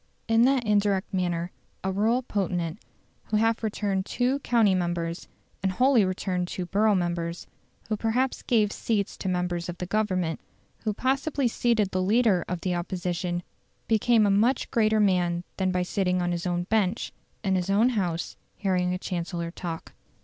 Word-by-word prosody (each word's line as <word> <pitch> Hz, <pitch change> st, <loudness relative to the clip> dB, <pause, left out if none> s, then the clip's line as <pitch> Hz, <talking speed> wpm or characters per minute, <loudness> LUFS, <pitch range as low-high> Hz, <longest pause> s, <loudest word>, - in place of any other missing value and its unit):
In 225 Hz, 0 st, +4 dB
that 265 Hz, -1 st, +3 dB
indirect 205 Hz, -2 st, +1 dB
manner 175 Hz, -1 st, -1 dB, 0.3 s
a 190 Hz, -, 0 dB
rural 225 Hz, +6 st, +1 dB
potentate, 180 Hz, -5 st, -2 dB, 0.5 s
who 215 Hz, -, 0 dB
half 225 Hz, +1 st, +2 dB
returned 205 Hz, -3 st, -1 dB
two 255 Hz, +3 st, 0 dB
county 230 Hz, -7 st, +3 dB
members, 175 Hz, -1 st, -2 dB, 0.3 s
and 190 Hz, -, +1 dB
wholly 250 Hz, +3 st, +4 dB
returned 185 Hz, -1 st, -1 dB
two 180 Hz, 0 st, -4 dB
borough 205 Hz, +4 st, +3 dB
members, 175 Hz, -1 st, -2 dB, 0.4 s
who 215 Hz, -, 0 dB
perhaps 240 Hz, +5 st, 0 dB
gave 215 Hz, -4 st, +2 dB
seats 205 Hz, -3 st, -1 dB
to 190 Hz, -, -3 dB
members 180 Hz, -1 st, -1 dB
of 175 Hz, -, -5 dB
the 180 Hz, -, -4 dB
Government, 185 Hz, -5 st, 0 dB, 0.5 s
who 215 Hz, -, +2 dB
possibly 270 Hz, +2 st, 0 dB
seated 225 Hz, -4 st, +1 dB
the 185 Hz, -, 0 dB
leader 205 Hz, -1 st, +3 dB
of 180 Hz, -1 st, -3 dB
the 180 Hz, 0 st, -1 dB
Opposition, 175 Hz, 0 st, -2 dB, 0.4 s
became 225 Hz, 0 st, +4 dB
a 200 Hz, -, +3 dB
much 230 Hz, +6 st, +2 dB
greater 220 Hz, -1 st, +3 dB
man 180 Hz, -4 st, +2 dB
than 185 Hz, -1 st, +1 dB
by 180 Hz, 0 st, +1 dB
sitting 180 Hz, 0 st, 0 dB
on 175 Hz, 0 st, 0 dB
his 175 Hz, +1 st, -2 dB
own 175 Hz, 0 st, 0 dB
bench, 210 Hz, +1 st, 0 dB, 0.3 s
in 195 Hz, -2 st, +1 dB
his 185 Hz, 0 st, 0 dB
own 215 Hz, +5 st, +4 dB
House, 180 Hz, -8 st, -2 dB, 0.2 s
hearing 180 Hz, -2 st, 0 dB
a -, -, -2 dB
Chancellor 170 Hz, -2 st, -4 dB
talk. 170 Hz, -2 st, -6 dB
190 Hz, 165 wpm, -26 LUFS, 180-220 Hz, 0.5 s, In